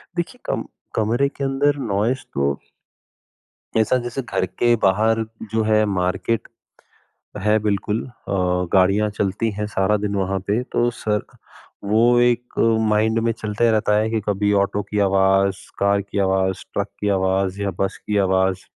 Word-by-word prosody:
देखिए 175 +8 -4
कम - - -2 0.3
कमरे 115 +6 +2
के 140 - -7
अंदर 140 +2 +1
नॉइज़ 115 +7 0
तो 70 0 +1 1.2
ऐसा 110 +3 +3
जैसे 120 +2 -4
घर 120 -6 -1
के 120 +6 +1
बाहर 110 +4 +3 0.3
जो 110 0 +1
है 110 0 +3
मार्केट 95 +3 -1 1.0
है 105 +1 +4
बिल्कुल, 105 +1 -1
अ, 125 - -15 0.6
गाड़ियाँ 100 +3 +3
चलती 105 +2 -1
हैं 105 +1 -3
सारा 100 0 +1
दिन 100 0 -2
वहाँ 95 0 -1
पे 105 +4 +1
तो 120 0 +2
सर 105 -3 -1 0.6
वो 115 +4 +4
एक 120 0 +1 0.4
माइंड 110 +1 +2
में 115 0 +1
चलता 110 -1 -3
ही - - +4
रहता 105 -1 +2
है 110 +1 +1
कि 110 0 0
कभी 105 0 +1
ऑटो 100 +1 -2
की 105 - -3
आवाज़, 95 0 +3 0.2
कार 100 0 +2
की 100 0 -4
आवाज़, 95 -1 +1
ट्रक - - -1
की 105 - 0
आवाज़ 95 0 0
या 100 -1 -1
बस 95 - -1
की 105 -1 +1
आवाज़। 95 -1 +1
105 Hz, 160 wpm, -21 LUFS, 95-115 Hz, 1.2 s, है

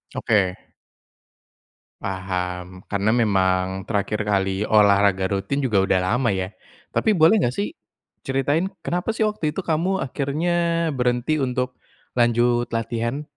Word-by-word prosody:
Oke. 100 -5 +2 1.5
Paham, 90 -1 -4
karena 100 +1 +1
memang 95 -4 +1
terakhir 105 0 -1
kali 95 0 0
olahraga 100 -2 +4
rutin 100 +9 -1
juga 110 -6 +1
udah 95 -1 +2
lama 120 +7 +1
ya? 95 0 -2 0.4
Tapi 220 - +2
boleh 165 +7 +5
nggak 120 -4 +1
sih 200 - -1 0.6
ceritain, 140 +6 +1 0.2
kenapa 180 +5 -1
sih - - +1
waktu 170 -8 -2
itu - - -2
kamu 175 +4 0
akhirnya 165 +5 0
berhenti 125 +4 +1
untuk 125 0 -2 0.4
lanjut 120 0 +2
latihan? 115 +4 -2
120 Hz, 120 wpm, -23 LUFS, 95-145 Hz, 1.5 s, boleh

